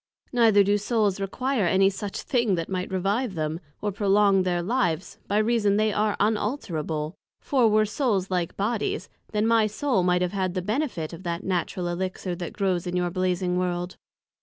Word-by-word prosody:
Neither 225 -4 +5
do 205 +1 +2
Souls 210 -2 +1
require 225 +2 0
any 195 +2 +4
such 200 +1 -5
thing 235 -7 +1
that 165 -1 -3
might 185 -1 -2
revive 195 +4 0
them, 155 0 -2 0.2
or 205 - 0
prolong 200 0 +3
their 175 -1 0
Lives, 185 -6 -1
by 205 - +1
reason 215 -2 +2
they 215 0 +2
are 210 0 +1
unalterable: 175 - -1 0.3
for, 255 -5 +2
were 215 0 +4
Souls 205 -4 0
like 180 -2 -1
Bodies, 210 +2 -1 0.2
then 210 0 +1
my 225 -1 +4
Soul 215 0 0
might 180 0 +2
have 180 +1 -2
had 185 -2 -1
the 185 - 0
benefit 215 - -2
of 170 - -8
that 170 0 -3
Natural 180 -1 -1
Elixir 185 +1 -3
that 175 -2 -5
grows 185 -4 0
in 175 - -3
your 180 -1 0
Blazing 180 0 0
World. 180 0 -2
195 Hz, 180 wpm, -25 LUFS, 180-215 Hz, 0.3 s, Neither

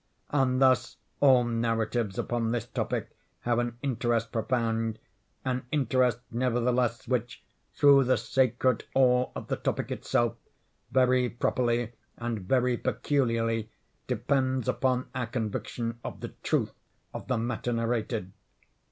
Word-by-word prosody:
And 130 -3 +2
thus 130 -3 +3 0.2
all 130 -3 +6
narratives 115 -2 -1
upon 120 -1 -1
this 115 -1 -1
topic - - -3 0.3
have 120 0 +1
an 120 -1 -2
interest 120 -3 0
profound; 115 -2 0 0.5
an 125 -1 -2
interest, 130 -4 +2
nevertheless, 120 0 0
which, 120 -1 -2 0.3
through 140 -2 +6
the 130 - +3
sacred 130 -2 +1
awe 125 -1 +4
of - - -5
the - - -1
topic - - -2
itself, - - 0 0.5
very 125 -1 +3
properly 120 -1 0 0.3
and 120 -2 -3
very 125 +5 +1
peculiarly 115 -6 0 0.4
depends 130 +1 0
upon 130 0 +1
our 125 -2 -2
conviction 115 0 -3
of - - -7
the - - -4
truth - - 0 0.4
of - - -7
the 125 - +1
matter 120 +1 -2
narrated. 115 -4 -1
120 Hz, 125 wpm, -28 LUFS, 115-130 Hz, 0.5 s, all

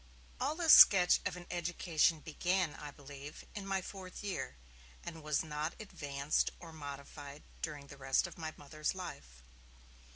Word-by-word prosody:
All 285 +4 0
this 330 -2 +6
sketch 180 -3 +9
of 180 -1 -5
an 175 - -9
education 170 -2 +1
began, 175 +2 0
I 150 - -8
believe, 145 +1 -10
in 200 -2 -6
my 195 -1 0
fourth 190 0 -8
year, 200 -2 -3 0.5
and 165 -1 -7
was 150 -1 0
not 155 +1 -3
advanced 145 -8 -1
or 165 -2 -10
modified 145 -1 -8 0.2
during 150 -3 -4
the 140 0 -12
rest 135 0 +2
of - - -8
my 160 -2 -5
Mother's 155 +3 -3
life. 65 - -8
155 Hz, 155 wpm, -34 LUFS, 145-180 Hz, 0.5 s, sketch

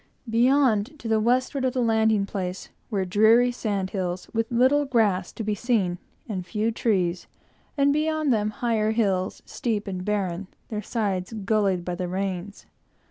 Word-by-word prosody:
Beyond, 245 +1 +3
to 240 - -7
the 220 -1 +2
westward 255 +4 +1
of 255 -1 +1
the 255 - 0
landing 220 -2 +3
place, 190 -2 -5 0.2
were 195 -3 -1
dreary 220 +6 +4
sand 200 -6 -2
hills, 180 -2 -3
with 225 0 0
little 260 +5 +4
grass 215 -9 +1
to 225 - -5
be 210 0 0
seen, 205 -6 0 0.3
and 195 -5 -3
few 215 +5 -1
trees, 185 -6 0 0.5
and 280 0 +4
beyond 310 -2 +1
them 210 -1 +1
higher 220 -1 0
hills, 195 -5 0
steep 220 -4 -2
and 185 -2 -4
barren, 195 -2 -2 0.2
their 210 -2 -3
sides 200 -3 -2
gullied 195 -4 +1
by 180 - -2
the 180 0 -3
rains. 190 +1 -4
215 Hz, 160 wpm, -25 LUFS, 190-235 Hz, 0.5 s, dreary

